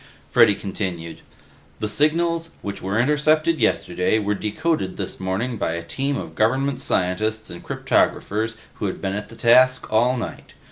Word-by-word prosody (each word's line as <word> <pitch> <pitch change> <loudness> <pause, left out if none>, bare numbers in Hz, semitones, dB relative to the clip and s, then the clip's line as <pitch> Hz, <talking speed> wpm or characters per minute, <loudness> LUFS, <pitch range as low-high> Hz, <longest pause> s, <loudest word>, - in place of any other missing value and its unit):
Freddy 100 - +6
continued, 90 -5 -5 0.6
"The 105 - -1
signals, 165 +8 +1
which 100 -1 -5
were 95 +4 -1
intercepted 155 +4 +2
yesterday, 90 -3 +1
were 105 -1 0
decoded 105 - -1
this - - -5
morning 95 +6 -2
by 80 - -1
a 85 0 -4
team 135 +10 -2
of - - -6
government 130 +4 +1
scientists 110 +4 -1
and 85 - -9
cryptographers 110 +2 0 0.2
who 105 - -1
had 95 - -4
been 95 -1 -2
at 105 0 -5
the 115 - -12
task 130 +1 +4
all 120 +4 +3
night. 115 - -7
110 Hz, 155 wpm, -22 LUFS, 100-135 Hz, 0.6 s, Freddy